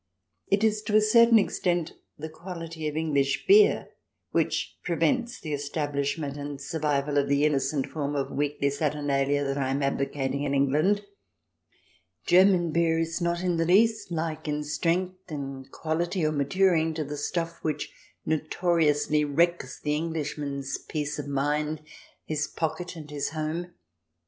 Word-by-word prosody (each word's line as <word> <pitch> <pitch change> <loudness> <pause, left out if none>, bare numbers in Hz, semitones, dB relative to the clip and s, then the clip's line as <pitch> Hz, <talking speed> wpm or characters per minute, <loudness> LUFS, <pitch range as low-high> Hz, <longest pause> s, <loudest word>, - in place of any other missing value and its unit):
It 200 +2 +2
is 215 -1 +2
to 210 - 0
a - - +8
certain 230 +2 +6
extent 175 -5 0 0.2
the 155 - -5
quality 165 -1 -6
of 150 0 -3
English 140 -4 0
beer 415 +2 +5 0.4
which - - 0
prevents 235 - 0
the 155 -2 -5
estab 145 +1 -3
lishment 140 0 -2
and 145 -1 -5
survival 145 -1 0
of 140 0 0
the 140 +1 +3
innocent 135 -1 +1
form 145 -2 -3
of 140 -1 -2
weekly 145 -1 0
saturnalia 145 -1 0
that 135 0 -1
I 130 -1 0
am 135 +1 0
advocating 140 0 -1
in 140 -1 0
England 150 +9 +2
I - - -23 1.2
German 180 -2 +5
beer 165 0 +2
is 165 +2 -1
not 170 +1 0
in 175 -2 +1
the 165 - +1
least 215 +3 +3
like, 160 -1 -3
in 150 0 -1
strength, 180 +4 -1
in 135 -2 -5
quahty, 170 +3 -1
or - - 0
maturing, 160 +2 +2
to 155 - -1
the 150 +1 -5
stuff 165 +3 -3
which 155 - -3 0.3
notoriously 155 -1 +1
wrecks 150 -2 0
the 150 - -1
Englishman's 150 -4 -3
peace 150 -1 -4
of 145 - -5
mind, 150 +2 0 0.5
his 150 -1 -1
pocket, 175 +2 -3
and 150 -2 -9
his 145 -1 -2
home. 160 +3 -4
155 Hz, 155 wpm, -27 LUFS, 145-170 Hz, 1.2 s, a